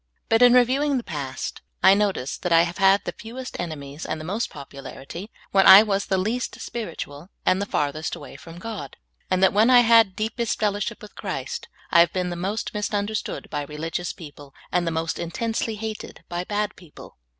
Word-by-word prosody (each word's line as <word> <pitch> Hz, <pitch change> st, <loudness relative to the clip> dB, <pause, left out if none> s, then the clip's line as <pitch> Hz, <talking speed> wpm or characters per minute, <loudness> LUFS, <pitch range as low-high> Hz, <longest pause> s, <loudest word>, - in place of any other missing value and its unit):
But 225 Hz, +1 st, +4 dB
in 245 Hz, 0 st, +8 dB
reviewing 265 Hz, +3 st, +3 dB
the 245 Hz, -, -3 dB
past, 140 Hz, -7 st, -5 dB, 0.2 s
I 190 Hz, -, +8 dB
notice 200 Hz, -10 st, 0 dB
that 180 Hz, -, -3 dB
I 165 Hz, 0 st, +7 dB
have 170 Hz, +2 st, -4 dB
had 195 Hz, +1 st, +4 dB
the -, -, -3 dB
few^est 250 Hz, +3 st, -8 dB
enemies 150 Hz, -3 st, -6 dB
and 160 Hz, -, -3 dB
the 155 Hz, -, -7 dB
most 205 Hz, +7 st, -2 dB
popularity 140 Hz, +6 st, -9 dB, 0.2 s
w^hen 195 Hz, -1 st, +5 dB
I 195 Hz, +3 st, +11 dB
was 200 Hz, -2 st, -1 dB
the 190 Hz, -, +1 dB
least 225 Hz, +7 st, -2 dB
spiritual 170 Hz, -7 st, -6 dB, 0.2 s
and 185 Hz, +2 st, +3 dB
the 200 Hz, -, -2 dB
farthest 150 Hz, -1 st, -1 dB
away -, -, -11 dB
from 165 Hz, 0 st, -11 dB
God; 220 Hz, +3 st, -7 dB, 0.3 s
and 185 Hz, 0 st, +2 dB
that, 190 Hz, -, +6 dB
wdien 215 Hz, +4 st, +4 dB
I 250 Hz, -1 st, +8 dB
have 230 Hz, -2 st, +6 dB
had 190 Hz, -, -24 dB
deepest 225 Hz, +2 st, -2 dB
fellowship 205 Hz, 0 st, -1 dB
with 210 Hz, -, -11 dB
Christ, 140 Hz, -10 st, -5 dB, 0.2 s
I 170 Hz, -, +6 dB
have 170 Hz, -, +5 dB
been 180 Hz, -1 st, -1 dB
the -, -, -3 dB
most 195 Hz, +5 st, -3 dB
misunderstood 210 Hz, 0 st, -2 dB
by 145 Hz, -, -2 dB
religious 160 Hz, +4 st, -4 dB
people 145 Hz, -3 st, -12 dB, 0.2 s
and 175 Hz, -1 st, +1 dB
the -, -, +1 dB
most 160 Hz, 0 st, -2 dB
intensely 225 Hz, +6 st, -2 dB
hated 215 Hz, 0 st, -7 dB
by 175 Hz, +1 st, -4 dB
bad 210 Hz, +1 st, -2 dB
people. 170 Hz, -, -14 dB
190 Hz, 195 wpm, -24 LUFS, 165-220 Hz, 0.3 s, I